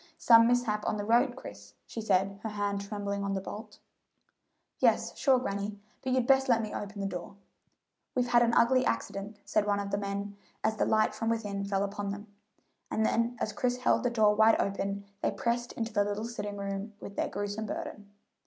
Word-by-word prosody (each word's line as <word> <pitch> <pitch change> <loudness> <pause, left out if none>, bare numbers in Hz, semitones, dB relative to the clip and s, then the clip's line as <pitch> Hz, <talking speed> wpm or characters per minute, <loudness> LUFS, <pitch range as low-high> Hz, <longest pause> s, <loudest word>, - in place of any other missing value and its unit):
"Some 230 -1 +7
mishap 235 -4 +1
on - - 0
the 205 - -3
road, 240 +3 +3
Chris," 100 - -11
she 225 - -6
said, 195 -1 +1
her 220 - -3
hand 205 -1 -2
trembling 200 0 -3
on 200 0 -1
the - - 0
bolt. 210 +3 -8 1.0
"Yes, - - +2
sure, 265 -2 +4
granny; 200 -3 -3 0.3
but 260 - -1
you'd 255 -1 +2
best 265 +1 +4
let 235 -2 +5
me 215 - -5
open 205 0 -5
the - - -1
door." 180 0 -5 0.8
"We've 245 -1 +1
had 240 -1 +5
an 235 -1 +3
ugly 255 +2 +5
accident," 195 - -2
said 210 -1 +1
one 205 0 +2
of 200 0 -4
the 200 - 0
men, 200 0 -4 0.3
as 220 0 +1
the - - +2
light 215 0 +3
from 225 - -2
within 205 -3 -2
fell 200 0 0
upon 200 0 -3
them; 200 +1 -5 0.6
and 220 - +1
then 230 +2 +1
as 215 - -2
Chris 245 +3 0
held 250 - +2
the 245 - +1
door 215 -3 +4
wide 220 +1 +5
open 200 0 -2 0.2
they - - +2
pressed 235 +4 -1
into 225 -1 -4
the 205 - +3
little 205 +2 -3
sitting 210 -3 -5
room 200 +1 -4
with 200 - -9
their - - -1
gruesome 205 +2 -3
burden. 205 0 -6
210 Hz, 205 wpm, -30 LUFS, 200-230 Hz, 1.0 s, Some